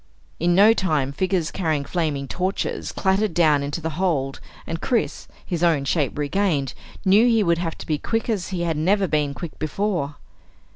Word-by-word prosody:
In 175 +1 +2
no 210 +4 +7
time 155 -10 0
figures 180 +2 0
carrying 155 -6 -1
flaming 150 -6 -2
torches 185 +7 -2
clattered 195 -1 +1
down 155 -4 +4
into 140 +1 -3
the 160 - -3
hold 135 -7 0 0.3
and 165 0 -4
Chris, 235 -3 -1 0.2
his 175 -3 -3
own 160 -5 +3
shape 145 -2 0
regained, 150 -3 0 0.3
knew 205 +5 +6
he 225 -3 +4
would 170 -2 +2
have 165 -2 -3
to - - -9
be 150 -2 -1
quick 225 +6 -2
as 210 -6 -1
he 180 -2 -3
had 165 -2 -1
never 190 +5 +2
been 150 -3 0
quick 170 -4 -8
before. 155 -2 -1
170 Hz, 180 wpm, -23 LUFS, 150-190 Hz, 0.3 s, no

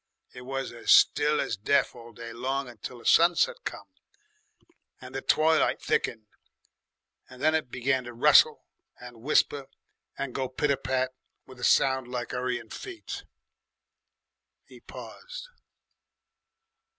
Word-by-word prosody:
It 125 - -10
was 135 +1 -4
as 115 - -8
still 150 +1 +5
as - - -2
death 140 +8 +2
all 120 -1 -12
day 115 +1 -9
long, 135 +3 -2
until 120 +1 -9
the 120 - -15
sunset 175 - +4
came - - -5 1.2
and - - -11
the - - -3
twilight 160 +1 +3
thickened, 110 -1 -1 1.0
and 130 - -13
then 155 +3 +3
it 155 -5 -1
began 130 +1 0
to 120 - -8
rustle 115 - +5 0.3
and 120 -2 -12
whisper 140 0 +1 0.5
and 140 -3 -4
go 130 -1 -2
pit 140 +3 0
a 140 - +1
pat 130 -1 -1 0.3
with 130 -1 -14
a - - -9
sound 130 -1 +3
like 125 -1 -5
'urrying 125 -2 -3
feet." 380 -3 -7 1.4
He - - -15
paused. - - -10
130 Hz, 135 wpm, -27 LUFS, 120-145 Hz, 1.4 s, still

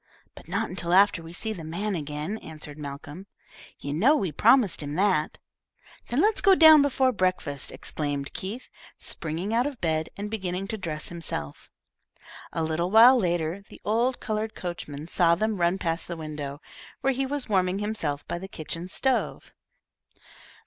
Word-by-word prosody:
"But - - -14
not 200 +6 -1
until 175 -1 -2
after 195 -2 +5
we 165 - -10
have 175 - -9
seen 220 -2 -3
the 165 - -7
man 190 +7 -3
again," 155 +5 -4
answered 155 -1 -9
Malcolm. 145 +6 -8 0.5
"You 140 - -5
know 235 - +4
we 195 - -1
promised 220 - +4
him 145 0 -4
that." 185 -4 +1 0.7
"Then 245 +5 +2
let's 425 +2 +3
go 390 -2 +6
down 315 -3 +9
before 265 -2 +2
breakfast," 185 - -1
exclaimed 145 -2 -4
Keith, 210 +7 -5 0.3
springing 170 +6 -4
out 240 +4 +2
of 275 -5 -7
bed 160 -1 0
and 205 +1 -5
beginning 190 -3 -3
to 220 - -3
dress 155 -4 -3
himself. 150 - -6 0.8
A 165 - -2
little 160 +3 -1
while 230 +5 +8
later, 175 -3 0
the - - -13
old 235 +4 +1
coloured 215 -1 -3
coachman 160 -4 -6
saw 170 -1 +3
them 215 +3 -1
run 175 +2 +3
past 165 -2 -2
the 170 - -5
window, 150 -2 -6 0.4
where 270 - +2
he 265 +1 -1
was 285 -1 -2
warming 185 -3 +1
himself 200 -9 -3
by 170 - -3
the 190 - -7
kitchen 170 0 -6
stove. 265 +6 -1
180 Hz, 170 wpm, -26 LUFS, 160-220 Hz, 0.8 s, down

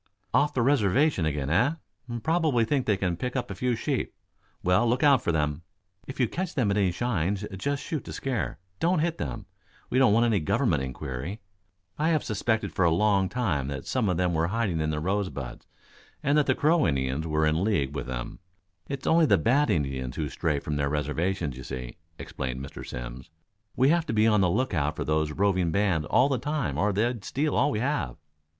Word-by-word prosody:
"Off 145 0 +3
the 125 - +2
reservation 130 - +3
again, 75 -2 -2
eh? 105 - +3 0.5
Probably 160 -8 +2
think 135 +1 0
they 105 -2 +3
can 95 -3 -1
pick 125 +9 -4
up 125 -5 -2
a - - -2
few 125 +5 0
sheep. - - -2 0.5
Well, 90 +7 +3
look 125 +2 +1
out 140 -4 +6
for 85 - 0
them. 75 -1 -1 0.5
If 130 - -8
you 125 - +3
catch 180 - -4
them 115 -7 +2
at 100 - +1
any 95 -3 +2
shines 100 -1 -1
just 140 +8 -2
shoot 155 -4 -3
to - - -7
scare. 130 - -3 0.2
Don't 175 +2 +2
hit 165 +1 0
them. 110 -3 -4 0.5
We 130 - +3
don't 130 -5 +5
want 115 +3 +4
any 110 -4 +2
Government 75 -3 +1
inquiry. 65 - -5 0.6
I 155 +2 +2
have 155 -3 +2
suspected 110 +1 -1
for 95 - +1
a 85 - +5
long 95 +2 +2
time 90 - -1
that 70 -1 -5
some 125 -6 0
of 90 - 0
them 90 0 +1
were 80 +1 +1
hiding 100 -4 -1
in 75 - 0
the 75 -1 -1
Rosebuds 85 -9 -3 0.6
and 140 +1 +2
that 150 -1 +3
the - - +3
Crow 160 +2 +3
Indians 70 +1 -1
were 80 0 +1
in 80 +3 +1
league 75 -11 0
with - - -4
them. - - -5 0.5
It's 140 -1 -5
only 165 -1 +4
the 100 - +5
bad 135 - +2
Indians 65 -5 -1
who 75 -2 -2
stray 75 0 -1
from 75 +1 -3
their 70 0 0
reservations, 75 +2 -1
you 65 - -8
see," 65 -1 -6 0.2
explained 65 -4 -5
Mr. - - -9
Simms. - - -7 0.5
"We 130 +2 +4
have 170 +1 +2
to - - -1
be 110 0 +3
on 105 -3 +4
the 90 - +3
lookout 85 - 0
for - - -3
these 75 0 +1
roving 95 -1 +1
bands 85 -5 +1
all 125 - +4
the 135 -3 0
time 140 - -2
or 105 +3 +2
they'd 110 +2 0
steal 145 +5 -1
all - - +3
we 105 - -1
have." 145 - -1
100 Hz, 210 wpm, -27 LUFS, 75-125 Hz, 0.6 s, out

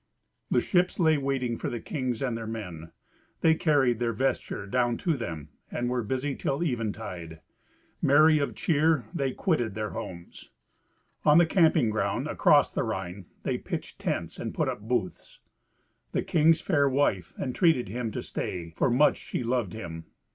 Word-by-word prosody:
The - - +3
ships 180 0 +1
lay 160 -3 +4
waiting 135 -4 -1
for - - -2
the 120 - -4
kings 130 -2 -3
and 125 -3 -1
their 115 -1 -5
men. 90 -8 -6 0.5
They 160 - +5
carried 140 -8 +2
their 120 -1 0
vesture 120 -4 -1
down 120 +2 +1
to 165 -3 0
them, 80 - -6 0.2
and 120 0 -2
were 125 -1 0
busy 130 +5 -2
till 140 +5 -1
eventide. 105 - -4 0.6
Merry 155 +2 +5
of 140 - -2
cheer 155 -3 +2
they 140 -6 0
quitted 125 - 0
their 110 -1 -3
homes. 85 -1 -8 0.7
On 150 +1 +6
the 175 - +7
camping 160 - +3
ground 105 -2 -1
across - - +4
the - - -1
Rhine 95 0 -4 0.2
they - - -1
pitched - - -6
tents - - -3
and - - -5
put - - +1
up - - -2
booths. 110 -4 -3 0.7
The - - 0
king's 160 0 +3
fair 145 -6 +2
wife 130 - 0
entreated 135 0 +2
him 115 +3 -3
to - - -4
stay, 85 -2 -4
for 80 - +1
much 140 +5 +4
she - - -4
loved 120 -5 -1
him. 80 -6 -7
125 Hz, 165 wpm, -28 LUFS, 105-145 Hz, 0.7 s, the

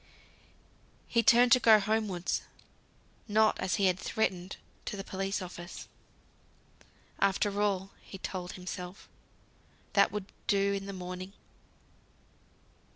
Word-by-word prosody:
So - - -29 1.0
he 235 - +3
turned 240 +2 +6
to 255 - +8
go 220 -3 +7
homewards; 205 -4 -1 0.9
not, 215 0 +3
as 185 - 0
he 200 - +2
had 185 0 +2
threatened, 185 -4 -1 0.3
to 205 - -4
the 195 - -4
police 195 0 -3
office. 175 0 -8 1.3
After 200 +1 +1
all 195 -2 0
(he 195 - -10
told 185 -1 -5
himself), 180 +1 -7 0.9
that - - +5
would 210 -2 -4 0.2
do 200 -1 +3
in 195 0 -4
the - - -4
morning. 185 +1 -6
195 Hz, 120 wpm, -31 LUFS, 185-210 Hz, 1.3 s, to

